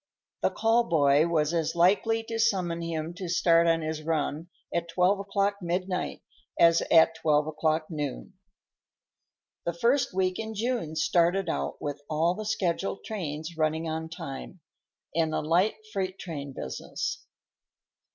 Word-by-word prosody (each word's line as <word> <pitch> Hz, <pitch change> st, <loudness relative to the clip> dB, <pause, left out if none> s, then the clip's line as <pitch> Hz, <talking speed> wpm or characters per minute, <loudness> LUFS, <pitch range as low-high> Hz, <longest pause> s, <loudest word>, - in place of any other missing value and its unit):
The -, -, +3 dB
call 230 Hz, +1 st, +2 dB
boy 145 Hz, -3 st, +4 dB
was 155 Hz, -1 st, +1 dB
as 165 Hz, -1 st, 0 dB
likely 205 Hz, +6 st, +3 dB
to 225 Hz, 0 st, -4 dB
summon 185 Hz, -7 st, +1 dB
him 165 Hz, 0 st, -3 dB
to 180 Hz, 0 st, -6 dB
start 170 Hz, -1 st, +4 dB
on 165 Hz, -1 st, +2 dB
his 155 Hz, 0 st, -3 dB
run 155 Hz, +1 st, -2 dB, 0.2 s
at 170 Hz, 0 st, -1 dB
twelve 180 Hz, +4 st, +2 dB
o'clock 200 Hz, 0 st, 0 dB
midnight 180 Hz, +1 st, -2 dB, 0.4 s
as 170 Hz, 0 st, +6 dB
at 165 Hz, 0 st, +6 dB
twelve 150 Hz, -2 st, +2 dB
o'clock 155 Hz, 0 st, 0 dB
noon. 150 Hz, +3 st, -4 dB, 1.3 s
The 170 Hz, -, -1 dB
first 245 Hz, +9 st, +2 dB
week 185 Hz, 0 st, 0 dB
in 220 Hz, 0 st, -5 dB
June 225 Hz, -8 st, -2 dB
started 170 Hz, +3 st, +2 dB
out -, -, -2 dB
with 145 Hz, 0 st, -4 dB
all 160 Hz, +3 st, +2 dB
the 215 Hz, +3 st, -6 dB
scheduled 190 Hz, -1 st, -1 dB
trains 160 Hz, -5 st, -5 dB
running 160 Hz, +1 st, 0 dB
on 160 Hz, 0 st, -3 dB
time, 150 Hz, +2 st, -8 dB, 0.5 s
and 160 Hz, -1 st, +1 dB
a -, -, +1 dB
light 175 Hz, +7 st, +2 dB, 0.2 s
freight 190 Hz, -1 st, -2 dB
business. 140 Hz, -, -5 dB
170 Hz, 140 wpm, -28 LUFS, 155-190 Hz, 1.3 s, as